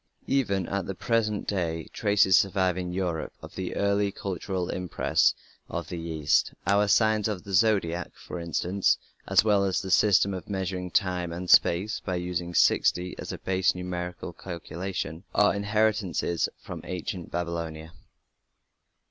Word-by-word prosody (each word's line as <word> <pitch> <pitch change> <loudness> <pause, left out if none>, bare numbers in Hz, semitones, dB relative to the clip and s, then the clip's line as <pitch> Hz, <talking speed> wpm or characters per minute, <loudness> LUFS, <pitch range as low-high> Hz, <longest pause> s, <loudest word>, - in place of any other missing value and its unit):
Even 100 -9 +1
at 100 0 -2
the 95 - -4
present 110 -1 0
day 80 -5 -1
traces 100 -3 +4
survive 95 -2 +2
in 90 -1 -3
Europe 90 -3 -2
of - - -11
the 95 -1 -4
early 100 0 +1
cultural 95 -1 -3
impress 90 -2 +1 0.3
of - - -4
the 85 - -4
East; 80 -3 +1
our 100 +2 +3
"Signs 110 +1 +3
of 105 -4 -3
the 100 -1 -8
Zodiac", 95 -5 +2
for 90 - -8
instance, 85 +3 +1 0.3
as - - +5
well 105 -2 +3
as 95 -2 +1
the 95 - -5
system 100 0 +4
of 95 +1 -7
measuring 95 -2 -3
time 90 -2 0
and 90 +2 -5
space 95 +5 +4
by 95 - -3
using 90 -1 -3
60 90 +1 +3
as - - -5
a - - -5
basic 95 -1 +1
numeral 90 -1 -4
for 85 - -6
calculation, 85 -1 -5
are 105 - +5
inheritances 100 -4 0
from - - -8
ancient 90 -1 -5
Babylonia. 85 -2 -4
95 Hz, 150 wpm, -27 LUFS, 85-100 Hz, 0.3 s, as